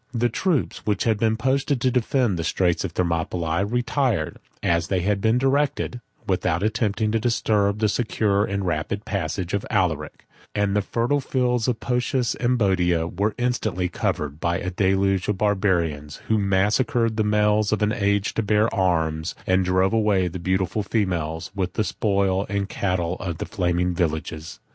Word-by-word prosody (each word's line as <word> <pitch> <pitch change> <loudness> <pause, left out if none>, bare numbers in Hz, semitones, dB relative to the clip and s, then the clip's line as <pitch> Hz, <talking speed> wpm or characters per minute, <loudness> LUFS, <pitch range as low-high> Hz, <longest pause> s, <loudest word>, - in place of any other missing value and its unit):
The 120 +1 +2
troops 160 - 0
which 105 -2 0
had 110 -3 +1
been 110 0 +2
posted 135 +2 0
to 130 - +2
defend 120 -5 +1
the - - -1
Straits 90 0 +1
of 90 -4 -4
Thermopylae, 85 0 -1
retired, 120 - 0 0.3
as 85 -1 +1
they 95 -2 0
were 105 - +4 0.2
directed, 135 0 0 0.2
without 90 -2 0
attempting 110 -1 0
to 115 - +1
disturb 105 -3 +1
the 110 0 +2
secure 105 -2 +1
and 100 -1 -2
rapid 85 +5 -2
passage 90 -2 -3
of 100 - 0
Alaric; 85 -8 -1 0.3
7 105 -1 +1
and 100 - -1
the 105 - +3
fertile 120 +8 0
fields 125 -3 0
of 125 -3 +1
Phocis 125 -1 0
and 125 +1 0
Boeotia 90 -6 +1
were 100 +4 -1
instantly 110 -7 -1
covered 75 -4 -2
by 85 +1 0
a 90 - -3
deluge 95 0 +1
of 105 - 0
Barbarians 90 -8 0
who 110 -1 +3
massacred 105 +4 +1
the 110 - +1
males 105 0 +2
of 110 -1 +1
an 105 - +2
age 100 -3 0
to - - 0
bear 105 +1 +2
arms, 80 -5 0
and 95 0 +2
drove 95 +2 +2
away 105 -5 +2
the 90 +1 -5
beautiful 95 +3 0
females, 85 -6 -2
with 95 -2 -2
the 110 - 0
spoil 100 -2 0
and 100 -1 -1
cattle 90 -3 -1
of 85 -4 -4
the - - -4
flaming 90 -3 0
villages. 80 -1 -3
100 Hz, 170 wpm, -23 LUFS, 90-110 Hz, 0.3 s, were